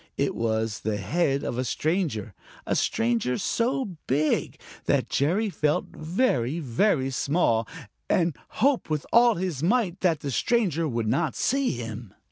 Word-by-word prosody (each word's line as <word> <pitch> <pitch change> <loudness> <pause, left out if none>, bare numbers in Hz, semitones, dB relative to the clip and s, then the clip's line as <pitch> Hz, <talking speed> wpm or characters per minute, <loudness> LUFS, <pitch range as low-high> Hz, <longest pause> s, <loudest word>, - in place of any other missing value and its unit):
It - - +1
was 110 -1 -1
the 110 -1 -2
head 140 - 0
of 120 - -3
a - - +1
stranger, 150 - -1 0.3
a - - 0
stranger 120 +2 +1
so 235 -6 -1
big 150 +4 0 0.3
that - - +1
Jerry 190 +10 +1
felt 150 -2 -1
very, 155 - 0
very 135 - +1
small 130 -5 +1 0.4
and 170 -4 +2 0.3
hoped 275 - +2
with 150 -2 -1
all 235 0 +6
his 175 -6 -3
might 190 0 +1
that 165 -5 +1
the 140 - -3
stranger 170 - +1
would 115 -4 -2
not 135 +4 0
see 275 +1 +1
him. 115 -3 -7
150 Hz, 145 wpm, -26 LUFS, 120-185 Hz, 0.4 s, all